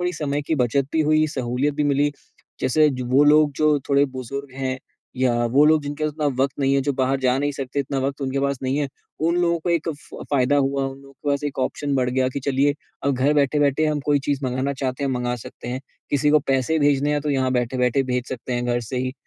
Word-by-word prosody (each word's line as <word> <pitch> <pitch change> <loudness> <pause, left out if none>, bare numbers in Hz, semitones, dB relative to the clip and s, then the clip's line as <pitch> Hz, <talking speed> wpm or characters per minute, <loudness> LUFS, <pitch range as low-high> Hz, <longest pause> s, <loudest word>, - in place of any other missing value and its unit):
थोड़ी 180 0 0
समय 145 -2 -2
की 160 - -1
बचत 130 +3 0
भी 160 - +2
हुई, 155 0 +4
सहूलियत 130 +1 -1
भी 150 - 0
मिली। 145 +1 +2 0.5
जैसे 150 +4 +3
ज 130 -2 -4
वो 140 +2 +6
लोग 150 0 +5
जो 155 -1 +3
थोड़े 140 0 +4
बुज़ुर्ग 135 +1 -7
हैं, 130 -1 -3 0.4
या 125 -1 +2
वो 135 +5 +4
लोग 155 -1 +4
जिनके 145 +2 -4
पास 155 - -1
उतना 150 0 -2 0.2
वक़्त 135 +1 -1
नहीं 135 0 +2
है, 140 - +3
जो 145 - 0
बाहर 135 0 0
जा 130 0 +2
नहीं 145 +1 0
सकते, 135 0 -3
इतना 135 0 -3
वक़्त 140 +2 -2
उनके 135 +1 -1
पास 140 -1 0
नहीं 130 +1 0
है। 145 -2 -1 0.3
उन 170 +2 +1
लोगों 170 -1 +2
को 175 - -2
एक 170 -1 0
फ 150 -3 -7
फ़ायदा 140 0 +3
हुआ, 135 0 +1
उन 135 0 -7
लोगों 140 0 -16
के 145 - -7
पास 140 0 0
एक 140 -2 -4
ऑप्शन 140 +2 -1
बढ़ 125 -2 +1
गया 130 0 +1
कि 140 +2 -5
चलिए 140 +1 +1 0.3
अ, 140 - +2
घर 135 +3 +2
बैठे-बैठे 145 +1 +2
हम 150 -1 0
कोई 145 -1 +3
चीज़ 140 -1 0
मँगाना 130 +2 -1
चाहते 135 0 -3
हैं, 135 - 0
मँगा 125 -1 -1
सकते 120 +1 -10
हैं। 125 +1 -3 0.3
किसी 145 +1 +2
को 150 - +6
पैसे 135 +4 +1
भेजने 145 0 +2
हैं, 145 - 0
तो 150 - -2
यहाँ 130 -2 +1
बैठे-बैठे 125 +1 +1
भेज 125 0 -1
सकते 125 0 -5
हैं 120 0 -1
घर 120 0 0
से 120 +2 -6
ही, 130 0 -2
140 Hz, 250 wpm, -22 LUFS, 130-145 Hz, 0.5 s, वो